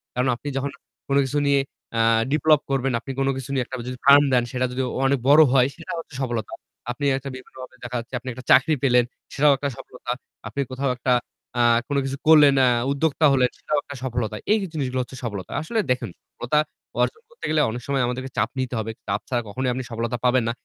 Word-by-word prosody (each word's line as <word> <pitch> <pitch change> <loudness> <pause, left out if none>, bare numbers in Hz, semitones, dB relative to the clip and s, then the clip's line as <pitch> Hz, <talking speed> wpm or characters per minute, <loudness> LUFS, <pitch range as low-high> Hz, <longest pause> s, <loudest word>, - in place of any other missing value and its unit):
কারণ 125 +1 +1
আপনি 145 - -10
যখন 140 +1 -2 0.4
কোন 140 - 0
কিছু 135 +3 -2
নিয়ে, 140 -1 +4 0.4
আ - - +2 0.3
ডেভেলপ 155 0 +4
করবেন, 135 -1 +1
আপনি 135 - -7
কোন 135 - +1
কিছু 135 0 -7
নিয়ে 130 -2 +1
একটা 130 - -7
যদি 125 - -6
farm 140 +1 +8
দেন 125 -1 +4
সেটা 125 0 0
যদি 130 +1 -2 0.2
অনেক 135 0 +2
বড় 150 +2 +8
হয় 130 -1 +5
সেটা - - -8
হচ্ছে 160 - -10
সফলতা। 120 -4 -3 0.4
আপনি 145 +3 -4
একটা 135 +1 -6
বিভিন্নভাবে 130 0 -11
দেখা 125 0 -5
যাচ্ছে 120 +3 -11
আপনি 130 +1 -7
একটা 130 +2 -10
চাকরি 155 +4 +6
পেলেন 125 -2 +5 0.3
সেটাও 145 +1 +5
একটা 140 +1 -2
সফলতা। 125 -1 -7 0.4
আপনি 140 - -3
কোথাও 135 +1 -1
একটা, 125 +1 -1 0.5
আ - - +5 0.3
কোন 145 - -1
কিছু 135 +1 -3
করলেন, 150 -3 +8
আ - - +4 0.2
উদ্যোক্তা 155 +2 +1
হলেন 125 -2 +3
সেটাও 150 - -1
একটা 140 - -9
সফলতা। 120 -4 -2 0.2
এই 215 - +5 0.2
জিনিসগুলো 130 -4 -2
হচ্ছে 130 +1 -11
সফলতা। 105 -6 -5
আসলে 220 +9 -2
দেখেন 125 - -1 0.2
সফলতা 125 +5 0 0.4
অর্জন 445 - 0
করতে 485 - -9
গেলে 155 -1 +3
অনেক 120 +2 -5
সময় 140 -1 +1
আমাদেরকে 130 +2 -4
চাপ 105 +2 +2
নিতে 130 -1 -2
হবে। 110 0 -3 0.2
চাপ 100 +1 0
ছাড়া 120 -2 0
কখনোই 125 +5 -2
আপনি 130 +1 -3
সফলতা 115 +2 -2
পাবেন 125 0 +4
না। - - +1
130 Hz, 210 wpm, -23 LUFS, 125-140 Hz, 0.5 s, farm